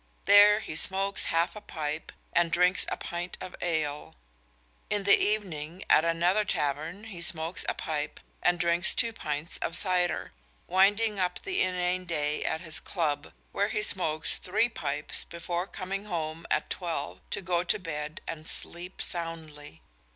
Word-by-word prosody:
There 205 +1 +7
he 155 - -6
smokes 195 +3 +4
half 170 +1 +1
a 210 - -8
pipe 155 -4 -4 0.2
and 170 -1 +3
drinks 180 +2 +3
a - - -3
pint 175 +1 -5
of 185 - -7
ale. 155 -4 -2 0.7
In 205 -1 0
the 200 0 +7
evening 180 -5 -1
at - - +6
another 170 +5 +2
tavern 155 +3 -2
he 200 -6 -8
smokes 170 -1 +1
a - - -1
pipe 150 -2 -3 0.2
and 175 0 +2
drinks 170 +1 +3
two 230 -2 +1
pints 150 -5 -2
of 170 - -1
cider, 180 -2 +2 0.3
winding 205 +3 +3
up 180 -1 -1
the 375 -2 0
inane 180 0 +1
day 150 -3 0
at 160 - -1
his 160 -3 0
club, 155 -5 -1 0.2
where 200 - +1
he 215 -2 0
smokes 160 -6 +1
three 235 - +1
pipes 150 -8 -2
before 170 +2 -4
coming 195 +1 -5
home 165 -4 -4
at - - 0
twelve 160 - -3
to - - -2
go 175 -1 0
to 180 - +1
bed 155 -4 -5
and 155 0 -6
sleep 175 +2 -4
soundly. 160 - -7
175 Hz, 160 wpm, -28 LUFS, 155-190 Hz, 0.7 s, There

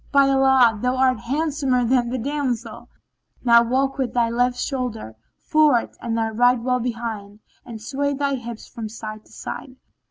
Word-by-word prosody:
By 280 -1 +5
Allah, 265 -5 +4
thou 250 +1 0
art 255 -2 +3
handsomer 275 -1 0
than 240 0 +2
the 255 - -2
damsel.[FN#17] 250 -3 -3 0.6
Now, 235 -1 +7
walk 265 +4 0
with 255 -2 -2
thy 235 -1 +2
left 245 +1 +1
shoulder 245 - -4 0.3
forwards 305 -6 +2
and 230 -1 -2
thy 225 -1 0
right 245 +3 +3
well 250 +1 0
behind, 225 -4 -5 0.3
and 230 -2 -7
sway 280 +5 -2
thy 280 0 -1
hips 235 -3 -6
from 225 -2 -7
side 215 0 -8
to - - -22
side." 255 -2 -7
245 Hz, 165 wpm, -22 LUFS, 230-270 Hz, 0.6 s, Now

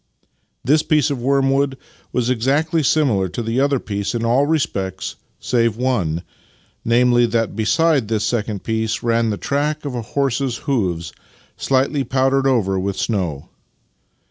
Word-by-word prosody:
This 150 +4 +3
piece 150 -2 +2
of 135 -4 -3
wormwood 135 +1 +1 0.3
was 125 0 0
exactly 145 +7 +1
similar 130 -11 +2
to 120 - -4
the 115 +3 -1
other 140 0 +2
piece 100 -1 -3
in 115 0 -1
all 130 +5 +3
respects 95 - -2 0.2
save 115 -3 +1
one 95 -11 -1 0.3
— - - -33 0.3
namely, 120 +1 +3
that 115 -2 -1
beside 130 +4 +2
this 110 -1 -1
second 105 -4 -2
piece 110 0 -2
ran 115 -1 +1
the 105 - -2
track 150 +4 -2
of 140 - -3
a 120 - -3
horse's 130 0 -1
hoofs, 90 - -1 0.4
slightly 135 +1 +1
powdered 135 +2 +1
over 100 -8 +1
with 95 0 -2
snow. 90 - -2
120 Hz, 145 wpm, -20 LUFS, 110-135 Hz, 0.4 s, This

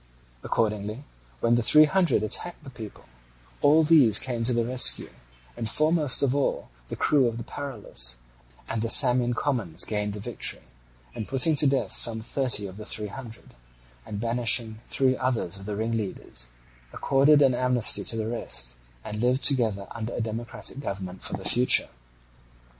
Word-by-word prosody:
Accordingly, 105 +3 -2 0.4
when 115 - +2
the 120 - +2
Three 150 +7 +6
Hundred 175 - +1
attacked 175 +11 0
the 135 - -10
people, 110 - -11 0.6
all 155 +3 +5
these 145 -10 +5
came 120 -3 -3
to 125 - 0
the 120 -1 0
rescue, 125 +1 +3 0.4
and 115 -2 -2
foremost 155 0 +2
of 135 -2 +1
all 140 -1 -2 0.2
the - - -6
crew 140 -4 +2
of 115 -1 -4
the 115 - -6
Paralus; 110 - -3 0.5
and 115 - -3
the 115 - -2
Samian 125 -1 +5
commons 105 - -1
gained 105 -1 -3
the 105 - -7
victory, 115 +2 -1 0.5
and 110 - -6
putting 135 +4 +2
to 145 - +3
death 135 0 0
some 115 -1 +3
thirty 120 -2 -1
of 95 0 -9
the 105 - -9
Three 105 -1 -6
Hundred, 115 -1 -11 0.5
and 105 +7 -7
banishing 115 -1 0
three 130 -1 +1
others 120 -8 -2
of 95 - -11
the 105 - -4
ringleaders, 105 - -4 0.4
accorded 145 +2 +3
an 135 -2 +3
amnesty 125 -5 +2
to - - -1
the 110 -1 -3
rest, - - -3 0.3
and 105 0 -6
lived 125 +2 +1
together 110 -8 +2
under 115 0 -6
a - - -4
democratic 115 +1 -5
government 95 -7 -6
for - - -3
the 95 0 -6
future. 125 +1 +2
115 Hz, 165 wpm, -25 LUFS, 105-130 Hz, 0.6 s, Three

